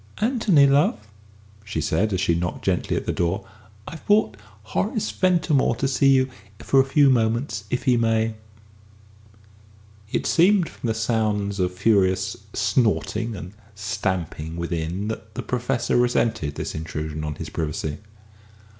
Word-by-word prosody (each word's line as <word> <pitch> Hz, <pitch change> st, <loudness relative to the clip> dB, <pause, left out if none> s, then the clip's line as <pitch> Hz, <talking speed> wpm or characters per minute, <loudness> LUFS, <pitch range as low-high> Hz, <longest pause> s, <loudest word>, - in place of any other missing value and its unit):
"Anthony, 215 Hz, -, +3 dB
love," 140 Hz, -3 st, +3 dB, 0.7 s
she 100 Hz, -6 st, -4 dB
said, 80 Hz, +8 st, 0 dB
as 95 Hz, -, 0 dB
she 90 Hz, -2 st, +2 dB
knocked 90 Hz, +1 st, -3 dB
gently -, -, 0 dB
at -, -, -3 dB
the -, -, 0 dB
door, 90 Hz, +4 st, -1 dB, 0.4 s
"I've 165 Hz, -, -9 dB
brought 205 Hz, -, +3 dB, 0.3 s
Horace 205 Hz, -, -2 dB
Ventimore 165 Hz, -9 st, +2 dB
to 135 Hz, -, -1 dB
see 135 Hz, +1 st, +3 dB
you 130 Hz, -1 st, +4 dB, 0.3 s
for 135 Hz, -, +2 dB
a -, -, +6 dB
few 140 Hz, 0 st, +4 dB
moments, 115 Hz, -2 st, 0 dB
if 125 Hz, -, -2 dB
he 125 Hz, -2 st, +3 dB
may." 115 Hz, -1 st, +1 dB, 1.8 s
It -, -, -1 dB
seemed 180 Hz, +1 st, +4 dB
from -, -, -6 dB
the 110 Hz, -, 0 dB
sounds 105 Hz, -3 st, 0 dB
of 90 Hz, -1 st, +1 dB
furious 95 Hz, -2 st, +2 dB, 0.2 s
snorting 110 Hz, +1 st, 0 dB
and 90 Hz, +1 st, -8 dB, 0.2 s
stamping 85 Hz, -5 st, -3 dB
within, 85 Hz, +3 st, -3 dB
that 110 Hz, 0 st, -7 dB
the 125 Hz, -, -4 dB
Professor 125 Hz, 0 st, -1 dB
resented 115 Hz, -11 st, +1 dB
this -, -, -4 dB
intrusion 80 Hz, -1 st, -5 dB
on 75 Hz, -1 st, -3 dB
his -, -, -7 dB
privacy. 75 Hz, -1 st, -3 dB
110 Hz, 145 wpm, -23 LUFS, 90-130 Hz, 1.8 s, a